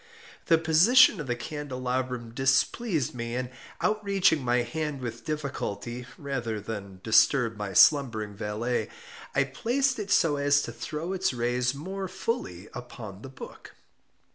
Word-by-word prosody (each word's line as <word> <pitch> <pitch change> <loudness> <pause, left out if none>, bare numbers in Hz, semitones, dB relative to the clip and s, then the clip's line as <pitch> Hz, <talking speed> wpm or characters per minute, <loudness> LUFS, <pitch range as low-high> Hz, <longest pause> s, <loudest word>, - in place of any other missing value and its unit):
The 165 - +6
position 175 +7 +5
of 145 - -7
the 120 - 0
candelabrum 125 -3 -4
displeased 135 - +1
me, 115 -1 -4
and 125 0 -3 0.3
outreaching 200 -8 +2
my 120 0 +2
hand 150 +3 -3
with 120 -2 -6
difficulty, 125 -5 -4
rather 125 -6 -3
than 100 -3 -7
disturb 115 +1 +4
my 105 -2 -5
slumbering 115 - +4
valet, 110 +2 -2 0.5
I 140 - +4
placed 245 - 0
it 205 -1 -5
so 165 -6 +3
as 145 0 +3
to - - -5
throw 150 +10 -5
its 190 -5 0
rays 125 +2 0
more 190 +6 -5
fully 185 - -4
upon 110 -5 -9
the 135 - -9
book. 130 - -11
130 Hz, 140 wpm, -27 LUFS, 120-160 Hz, 0.5 s, The